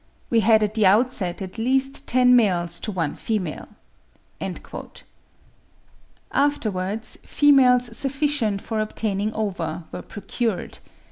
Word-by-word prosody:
We 230 Hz, -, +4 dB
had 220 Hz, -1 st, +4 dB
at 210 Hz, 0 st, -1 dB
the 215 Hz, -3 st, +3 dB
outset 200 Hz, -4 st, +2 dB
at 190 Hz, +4 st, -8 dB
least 265 Hz, +3 st, 0 dB
ten 250 Hz, 0 st, +5 dB
males 175 Hz, -7 st, +2 dB
to 215 Hz, -, -3 dB
one 165 Hz, -6 st, -2 dB
female." 195 Hz, -8 st, -3 dB, 2.6 s
Afterwards 220 Hz, -6 st, -1 dB
females 250 Hz, -5 st, +4 dB
sufficient 270 Hz, -7 st, 0 dB
for 220 Hz, -2 st, -3 dB
obtaining 215 Hz, -1 st, -2 dB
ova 175 Hz, -6 st, -3 dB
were -, -, -6 dB
procured. 205 Hz, +1 st, -4 dB
220 Hz, 110 wpm, -23 LUFS, 190-250 Hz, 2.6 s, ten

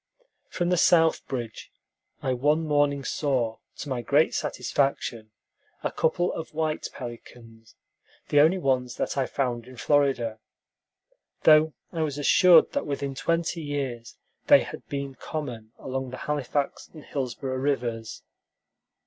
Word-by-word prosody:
From 175 Hz, -1 st, -1 dB
the 180 Hz, -, +2 dB
south 165 Hz, -1 st, +4 dB
bridge 120 Hz, -4 st, -5 dB, 0.5 s
I 130 Hz, -, +1 dB
one 150 Hz, +6 st, +2 dB
morning 145 Hz, -2 st, +2 dB
saw, 125 Hz, -8 st, -1 dB, 0.2 s
to -, -, -6 dB
my 130 Hz, -2 st, -2 dB
great 145 Hz, +6 st, +3 dB
satisfaction, 120 Hz, -5 st, -1 dB, 0.5 s
a -, -, -1 dB
couple 175 Hz, +3 st, +1 dB
of 160 Hz, -1 st, -7 dB
white 155 Hz, -1 st, -1 dB
pelicans, 115 Hz, -2 st, -11 dB, 0.5 s
the 145 Hz, -, +4 dB
only 160 Hz, +6 st, +5 dB
ones 130 Hz, -6 st, 0 dB
that -, -, -2 dB
I 135 Hz, -2 st, 0 dB
found 125 Hz, -3 st, -2 dB
in 130 Hz, -1 st, -12 dB
Florida, 130 Hz, -5 st, +1 dB, 1.0 s
though 155 Hz, 0 st, +6 dB, 0.2 s
I 165 Hz, -, -2 dB
was 145 Hz, -3 st, -1 dB
assured 170 Hz, +3 st, +6 dB
that -, -, -2 dB
within 140 Hz, -1 st, -3 dB
twenty 165 Hz, +4 st, -1 dB
years 135 Hz, -6 st, -4 dB, 0.3 s
they -, -, +7 dB
had -, -, -8 dB
been 140 Hz, -1 st, -4 dB
common 125 Hz, -6 st, -6 dB
along 130 Hz, 0 st, -4 dB
the 130 Hz, -, -7 dB
Halifax 145 Hz, -1 st, -2 dB
and 155 Hz, -3 st, -12 dB
Hillsborough 130 Hz, -1 st, -3 dB
rivers. 120 Hz, -5 st, -2 dB
140 Hz, 135 wpm, -26 LUFS, 125-155 Hz, 1.0 s, they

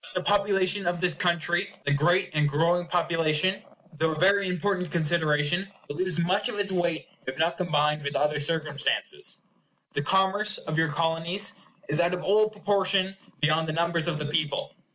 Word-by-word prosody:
But 185 Hz, -, -5 dB
the -, -, +3 dB
population 200 Hz, -2 st, +2 dB
of 175 Hz, 0 st, 0 dB
this 180 Hz, -1 st, +2 dB
country, 175 Hz, +1 st, 0 dB
the 145 Hz, -, +1 dB
great 175 Hz, +6 st, +2 dB
and 150 Hz, -1 st, +2 dB
growing 170 Hz, +4 st, +1 dB
population, 170 Hz, +1 st, +1 dB, 0.4 s
though 160 Hz, 0 st, +1 dB
a 155 Hz, -, -6 dB
very 200 Hz, +1 st, +4 dB
important 180 Hz, 0 st, -1 dB
consideration, 160 Hz, +2 st, +1 dB, 0.2 s
will 145 Hz, -, -6 dB
lose 185 Hz, -2 st, 0 dB
much 180 Hz, +4 st, +1 dB
of -, -, -5 dB
its 200 Hz, -1 st, -1 dB
weight 175 Hz, -3 st, -1 dB, 0.2 s
if 130 Hz, 0 st, -4 dB
not 165 Hz, +2 st, +1 dB
combined 150 Hz, -3 st, 0 dB
with 140 Hz, 0 st, -4 dB
other 150 Hz, +1 st, +1 dB
circumstances. 155 Hz, -, -1 dB, 0.5 s
The 145 Hz, -, -1 dB
commerce 190 Hz, +6 st, +3 dB
of 160 Hz, -, -5 dB
your 160 Hz, 0 st, +2 dB
Colonies 165 Hz, +5 st, -1 dB, 0.3 s
is 150 Hz, +3 st, -2 dB
out 175 Hz, +1 st, +2 dB
of 180 Hz, -, -7 dB
all 215 Hz, +2 st, +3 dB
proportion 195 Hz, -2 st, 0 dB, 0.3 s
beyond 155 Hz, +1 st, +2 dB
the 155 Hz, -, -2 dB
numbers 170 Hz, 0 st, 0 dB
of 170 Hz, -3 st, -1 dB
the 150 Hz, -, -4 dB
people. 150 Hz, 0 st, -2 dB
170 Hz, 175 wpm, -26 LUFS, 155-190 Hz, 0.5 s, very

